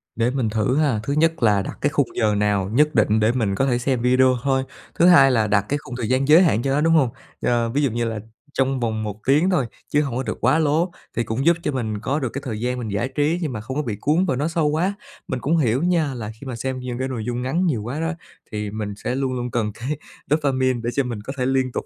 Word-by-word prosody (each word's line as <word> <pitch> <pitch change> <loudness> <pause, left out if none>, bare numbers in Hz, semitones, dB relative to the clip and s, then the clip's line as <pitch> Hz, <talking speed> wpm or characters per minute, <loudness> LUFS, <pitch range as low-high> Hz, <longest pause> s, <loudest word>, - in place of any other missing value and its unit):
Để 115 +1 +1
mình 125 -4 -1
thử 110 +4 0
ha. 140 -8 +2
Thứ 140 - -2
nhất 165 -1 +1
là 105 -3 +4
đặt - - -6
cái 145 - +2
khung 145 -4 +1
giờ 105 -2 +2
nào 100 -2 +1
nhất 150 +3 +3
định 110 -1 +3
để 110 +1 +3
mình 110 -6 0
có 135 - +1
thể 125 -3 +1
xem 125 0 -1
video 130 +1 +4
thôi, 135 -1 +1 0.3
thứ 170 - +4
hai 140 -7 +7
là 110 -4 +2
đặt 105 -1 +3
cái 145 - 0
khung 125 - -8
thời 115 -4 -3
gian 130 +1 +1
giới 155 +4 +7
hạn 135 - +2
cho 135 - -1
nó, 145 - +2
đúng 165 +1 +3
hông? 145 -6 +4 0.3
Ờ, 120 -1 +1
ví 140 +5 0
dụ 135 - +1
như 120 +1 -1
là 110 -2 -3 0.3
trong 135 0 +1
vòng 110 -2 -1
1 105 -1 -5
tiếng 150 +7 +4
thôi 165 -9 +2 0.2
chứ 145 - +2
hông 135 -5 -3
có 130 - -1
được - - -4
quá 160 - +3
lố, 160 +3 +1 0.2
thì 120 - +1
cũng 115 +5 -2
giúp 170 0 +5
cho - - 0
mình 110 -6 -3
có 135 +7 -1
được 130 -4 -2
cái 140 - -4
thời 110 -4 -4
gian 125 +2 -1
mình 115 - -4
giải 100 +5 -1
trí 155 +4 +1
nhưng 150 -6 -2
mà 110 - -4
không 130 +5 -5
có 150 - 0
bị 115 -7 -3
cuốn 160 +6 +2
vào 130 -8 0
nó 145 - 0
sâu 165 -2 0
quá. 165 +6 +1 0.3
Mình 130 - -3
cũng 155 +7 +1
hiểu 130 -1 +1
nha, 170 -5 +1
là 110 -4 -5
khi 140 - -9
mà 130 - -4
xem 130 +2 -3
những 125 -1 -5
cái 130 - -1
nội 120 -5 -4
dung 120 0 -2
ngắn 160 +9 0
nhiều 125 -12 0
quá 125 +7 -4
đó, 165 +2 -1 0.4
thì 105 -2 -4
mình 105 -1 -4
sẽ 125 - -1
luôn 135 -1 -1
luôn 125 -1 -3
cần 110 -3 -1
cái 135 +7 -4 0.3
dopamine 130 -4 +1
để 120 - 0
cho 140 - +1
mình 120 -4 -5
có 135 +6 -6
thể 125 - 0
liên 130 -1 +1
tục - - -4
130 Hz, 290 wpm, -22 LUFS, 115-145 Hz, 0.4 s, hai